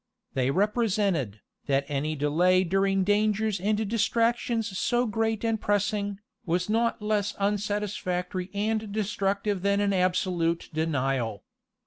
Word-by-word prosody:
They 130 Hz, -1 st, +1 dB
represented, 195 Hz, -, 0 dB, 0.3 s
that 140 Hz, -1 st, +2 dB
any 150 Hz, +2 st, -2 dB
delay 175 Hz, +6 st, +3 dB
during 195 Hz, +1 st, +1 dB
dangers 210 Hz, 0 st, +1 dB
and 210 Hz, +3 st, 0 dB
distractions 230 Hz, 0 st, 0 dB
so 240 Hz, +5 st, +1 dB
great 225 Hz, -1 st, -1 dB
and 225 Hz, -1 st, 0 dB
pressing, 205 Hz, 0 st, 0 dB, 0.3 s
was 180 Hz, +3 st, -1 dB
not 230 Hz, -1 st, +1 dB
less 210 Hz, -1 st, 0 dB
unsatisfactory 200 Hz, -3 st, -2 dB
and 215 Hz, +1 st, -1 dB
destructive 200 Hz, -1 st, -1 dB
than 200 Hz, +1 st, +2 dB
an 200 Hz, -1 st, +1 dB
absolute 180 Hz, -2 st, 0 dB
denial. 135 Hz, -8 st, -1 dB
200 Hz, 115 wpm, -27 LUFS, 180-215 Hz, 0.3 s, delay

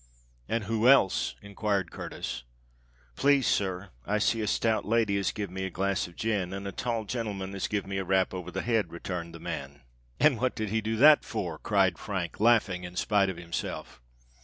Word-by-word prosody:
"And 115 Hz, -1 st, 0 dB
who 110 Hz, +2 st, +1 dB
else?" 130 Hz, -8 st, +4 dB
enquired 100 Hz, -3 st, -1 dB
Curtis. -, -, -5 dB, 0.7 s
"Please, 140 Hz, -2 st, +4 dB
sir, 95 Hz, 0 st, 0 dB
I 105 Hz, +8 st, 0 dB
see 110 Hz, +2 st, +1 dB
a 105 Hz, -, -1 dB
stout 110 Hz, +1 st, +1 dB
lady 110 Hz, -2 st, +2 dB
as 100 Hz, -, 0 dB
give 100 Hz, -4 st, -5 dB
me 95 Hz, +1 st, -4 dB
a 95 Hz, -, -2 dB
glass 95 Hz, +1 st, -1 dB
of 85 Hz, -, -15 dB
gin, 100 Hz, -5 st, -1 dB
and 100 Hz, 0 st, -5 dB
a -, -, -3 dB
tall 115 Hz, +1 st, -2 dB
genelman 100 Hz, -4 st, -4 dB
as 100 Hz, -, -2 dB
give 105 Hz, -2 st, -2 dB
me 95 Hz, 0 st, -3 dB
a -, -, -1 dB
rap 95 Hz, 0 st, +1 dB
over 90 Hz, -1 st, -5 dB
the 95 Hz, +2 st, -4 dB
head," 110 Hz, -7 st, +1 dB
returned 85 Hz, 0 st, -5 dB
the -, -, -9 dB
man. 70 Hz, +1 st, -6 dB, 0.4 s
"And 140 Hz, -7 st, +4 dB
what 130 Hz, -1 st, +1 dB
did 110 Hz, -2 st, -2 dB
he 110 Hz, +2 st, 0 dB
do 110 Hz, +1 st, -1 dB
that 150 Hz, +6 st, +7 dB
for?" 90 Hz, -8 st, -4 dB
cried 95 Hz, -4 st, +2 dB
Frank, 90 Hz, -5 st, -4 dB
laughing 110 Hz, -5 st, +3 dB
in 90 Hz, 0 st, -8 dB
spite 100 Hz, +1 st, +2 dB
of 95 Hz, -, -5 dB
himself. 85 Hz, -7 st, -5 dB
100 Hz, 200 wpm, -29 LUFS, 90-110 Hz, 0.7 s, that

